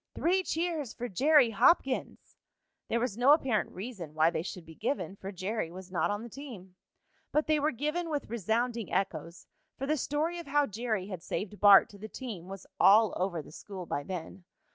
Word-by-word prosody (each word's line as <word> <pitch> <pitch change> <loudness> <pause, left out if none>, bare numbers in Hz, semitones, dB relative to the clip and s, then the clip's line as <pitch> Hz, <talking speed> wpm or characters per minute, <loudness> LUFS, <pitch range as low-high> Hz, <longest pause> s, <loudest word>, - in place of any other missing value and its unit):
"Three 370 +3 +2
cheers 325 -8 -2
for 245 - -4
Jerry 270 - +4
Hopkins!" 270 - +1 0.5
There 235 - 0
was 235 -2 -2
no 270 +4 +7
apparent 265 -8 +1
reason 185 -7 -8
why 160 +1 +4
they 160 - -2
should 175 0 -7
be 160 - -12
given, 195 - -3
for 195 0 -7
Jerry 195 0 -3
was 185 +1 -10
not 185 - +1
on 205 +2 -2
the - - -7
team. 230 -9 -10 0.6
But 300 +1 +2
they 310 -1 +2
were 295 +1 +2
given 305 +6 -2
with 295 -3 -2
resounding 230 +1 -1
echoes, 170 -3 -2 0.3
for 270 - -3
the 305 +2 +1
story 310 +5 -1
of 340 - -9
how 290 +1 +3
Jerry 220 -3 -2
had 185 -4 -6
saved 205 +3 -4
Bart 205 -1 +8
to 200 - -14
the 215 +2 -8
team 210 -10 -7
was 195 0 -8
all 215 +1 +6
over 175 -4 -2
the - - -14
school 185 +2 -8
by 145 - -2
then. 180 +3 -7
220 Hz, 195 wpm, -30 LUFS, 185-280 Hz, 0.6 s, Bart